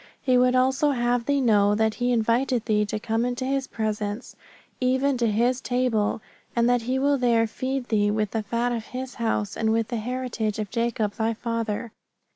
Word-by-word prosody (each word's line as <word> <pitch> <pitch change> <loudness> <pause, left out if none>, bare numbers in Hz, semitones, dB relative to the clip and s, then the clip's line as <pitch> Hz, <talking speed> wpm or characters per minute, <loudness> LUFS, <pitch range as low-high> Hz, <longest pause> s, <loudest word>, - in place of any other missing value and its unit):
He 255 -2 +1
would 250 0 +4
also 265 +3 +3
have 240 -2 0
thee 285 -1 +2
know 205 -4 +4
that 220 0 +1
He 245 +1 -1
inviteth 235 +1 +1
thee 210 -2 +1
to 210 - -3
come 225 +2 -1
into 245 +1 -2
His 270 0 -1
presence, 215 0 -3 0.4
even 260 +2 +2
to 235 - +2
His 240 +4 +1
table, 245 -4 0 0.3
and 235 0 +3
that 245 -1 +3
He 250 +3 -1
will 280 +1 +2
there 235 -2 +3
feed 260 +3 -3
thee 205 -2 +2
with 210 -1 -1
the 225 - -1
fat 235 +3 -1
of 230 -2 -3
His 255 +1 -6
house, 220 -3 -1
and 220 0 0
with 225 -1 0
the 240 - -2
heritage 235 -2 -3
of 210 -2 -4
Jacob 230 -3 -1
thy 225 +1 -1
father. 230 -1 -3
235 Hz, 195 wpm, -25 LUFS, 220-255 Hz, 0.4 s, would